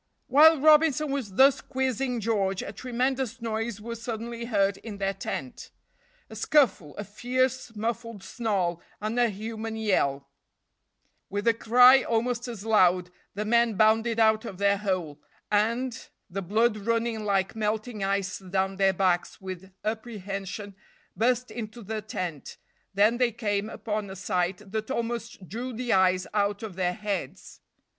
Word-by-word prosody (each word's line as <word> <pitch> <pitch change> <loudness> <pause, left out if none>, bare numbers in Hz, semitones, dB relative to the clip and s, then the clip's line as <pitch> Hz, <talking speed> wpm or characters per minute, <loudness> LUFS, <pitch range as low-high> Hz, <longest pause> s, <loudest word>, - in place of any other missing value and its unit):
While 310 +4 +6
Robinson 305 -1 +4
was 260 -8 -3
thus 270 +5 +5
quizzing 260 -2 -1
George, 195 -3 0
a - - -6
tremendous 255 +2 -2
noise 225 -1 -3
was 230 +1 -7
suddenly 235 0 -5
heard 200 -4 +1
in 210 -1 -8
their 195 0 -1
tent. 235 +5 -6 0.6
A - - -11
scuffle 215 - +2
a 205 - -3
fierce, 245 +3 -1
muffled 230 -1 -4
snarl 190 -7 -1 0.2
and 215 +3 -2
a 240 -1 +4
human 220 +2 -5
yell; 140 -11 0 1.0
with 205 +3 -3
a 230 - +6
cry, 250 +3 +6
almost 240 +2 -1
as 225 -4 -7
loud, 180 -4 +3 0.2
the 210 +1 -2
men 235 0 +3
bounded 225 +2 +3
out 220 -1 +4
of 195 -6 -7
their 200 +1 +3
hole, 180 -8 -2 0.3
and, 230 +4 0 0.2
the 195 +2 -3
blood 215 +4 +2
running 230 +1 -1
like 195 -1 0
melting 215 0 -2
ice 195 -1 -1
down 190 0 -2
their 195 -1 +3
backs 180 -2 0
with 190 0 -8
apprehension, 205 -3 -5 0.4
burst 250 +2 +1
into 230 0 -7
the 215 +2 -4
tent; 180 -8 -5 0.3
then 210 +4 +3
they 250 -1 +2
came 210 -2 -2
upon 210 -2 -4
a 190 - -7
sight 185 +1 -2
that 220 +1 -3
almost 235 -5 -4
drew 245 +6 -5
the 245 0 -1
eyes 185 -1 +3
out 205 0 0
of 210 -5 -6
their 180 -1 0
heads. 200 -8 -5
215 Hz, 150 wpm, -27 LUFS, 195-235 Hz, 1.0 s, While